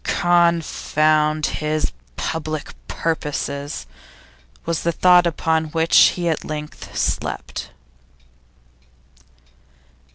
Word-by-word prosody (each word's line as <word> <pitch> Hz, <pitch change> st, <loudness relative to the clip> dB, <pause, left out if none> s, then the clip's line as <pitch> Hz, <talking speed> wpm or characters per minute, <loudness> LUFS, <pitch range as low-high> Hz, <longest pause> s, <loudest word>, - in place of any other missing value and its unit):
'Confound 155 Hz, -3 st, +2 dB
his 155 Hz, 0 st, -1 dB, 0.3 s
public 155 Hz, -2 st, -4 dB
purposes!' 145 Hz, -3 st, -3 dB, 0.8 s
was 165 Hz, -1 st, -1 dB
the 170 Hz, -, +1 dB
thought 180 Hz, +1 st, +5 dB
upon 160 Hz, -1 st, 0 dB
which 160 Hz, +1 st, 0 dB, 0.2 s
he 175 Hz, -1 st, -1 dB
at 160 Hz, -2 st, -1 dB
length 150 Hz, -1 st, -7 dB
slept. -, -, -3 dB
160 Hz, 75 wpm, -21 LUFS, 155-170 Hz, 0.8 s, thought